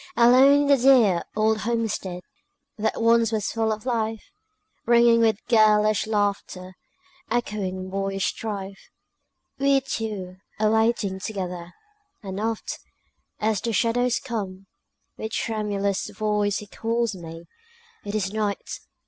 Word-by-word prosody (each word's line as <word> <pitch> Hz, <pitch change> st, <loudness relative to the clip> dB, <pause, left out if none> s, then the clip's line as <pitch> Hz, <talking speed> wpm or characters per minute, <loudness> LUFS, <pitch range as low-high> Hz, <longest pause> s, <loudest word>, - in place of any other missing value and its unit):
Alone 260 Hz, +4 st, +6 dB
in -, -, +1 dB
the 280 Hz, -1 st, +5 dB
dear 240 Hz, -9 st, +5 dB
old 215 Hz, 0 st, +2 dB
homestead 215 Hz, -6 st, -2 dB, 0.5 s
That 220 Hz, 0 st, -2 dB
once 230 Hz, -1 st, +4 dB
was 215 Hz, -2 st, -1 dB
full 225 Hz, -1 st, 0 dB
of 215 Hz, +2 st, -4 dB
life, 225 Hz, -, -2 dB, 0.6 s
Ringing 235 Hz, 0 st, +5 dB
with 220 Hz, -2 st, +1 dB
girlish 215 Hz, -1 st, +4 dB
laughter, 200 Hz, -3 st, -2 dB, 0.6 s
Echoing 200 Hz, -5 st, -2 dB
boyish 195 Hz, 0 st, -2 dB
strife, 200 Hz, -3 st, -5 dB, 0.7 s
We 275 Hz, 0 st, +4 dB
two 210 Hz, -8 st, -5 dB, 0.2 s
are 215 Hz, 0 st, +3 dB
waiting 220 Hz, -3 st, +1 dB
together; 180 Hz, -4 st, -5 dB, 0.5 s
And 190 Hz, 0 st, -5 dB
oft, 225 Hz, 0 st, -3 dB, 0.6 s
as 215 Hz, -1 st, 0 dB
the 230 Hz, -, -2 dB
shadows 245 Hz, +2 st, +1 dB
come, 195 Hz, -5 st, -5 dB, 0.5 s
With 220 Hz, 0 st, -6 dB
tremulous 205 Hz, -3 st, -1 dB
voice 210 Hz, 0 st, 0 dB
he 210 Hz, -, -7 dB
calls 230 Hz, +2 st, -2 dB
me, 165 Hz, -2 st, -9 dB, 0.6 s
"It 205 Hz, +1 st, -5 dB
is 200 Hz, -1 st, -1 dB
night! 210 Hz, -2 st, -3 dB
215 Hz, 125 wpm, -24 LUFS, 195-230 Hz, 0.7 s, Alone